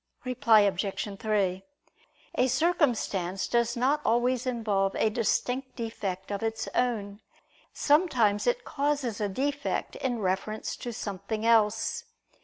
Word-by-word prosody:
Reply 235 -4 +4
Obj. 195 0 -1
3: 195 -4 0 0.7
A 255 - +2
circumstance 245 - +1
does 235 0 +1
not 275 +5 +2
always 245 +2 +1
involve 210 -6 0
a 220 - +2
distinct 250 +4 -1
defect 205 -5 -4
of 200 - -2
its 225 0 -2
own; 210 -4 -1 0.5
sometimes 255 - +2
it - - +1
causes 280 -6 -1
a 205 - 0
defect 285 +7 -2
in 250 -3 -1
reference 200 +2 -2
to 240 - -5
something 210 +1 -4
else. 225 -1 +2
225 Hz, 120 wpm, -28 LUFS, 200-255 Hz, 0.7 s, Reply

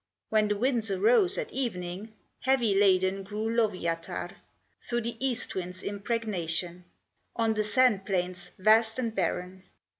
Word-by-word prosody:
When 215 -1 +3
the 210 0 0
winds 235 -1 +1
arose 235 - +3
at 475 -3 -3
evening, 205 - -4 0.3
Heavy 255 -5 +2
laden 195 -1 +3
grew 215 +3 -3
Lowyatar, 180 -7 -1 0.5
Through 240 0 -2
the 235 +1 -4
east 250 -3 +1
wind's 180 0 -5
impregnation, 190 -5 -3 0.5
On 225 -1 +1
the 215 0 0
sand 210 -2 +3
plains, 180 -2 -2
vast 220 +3 +4
and 235 -3 -2
barren. 185 0 -2
210 Hz, 130 wpm, -28 LUFS, 185-230 Hz, 0.5 s, vast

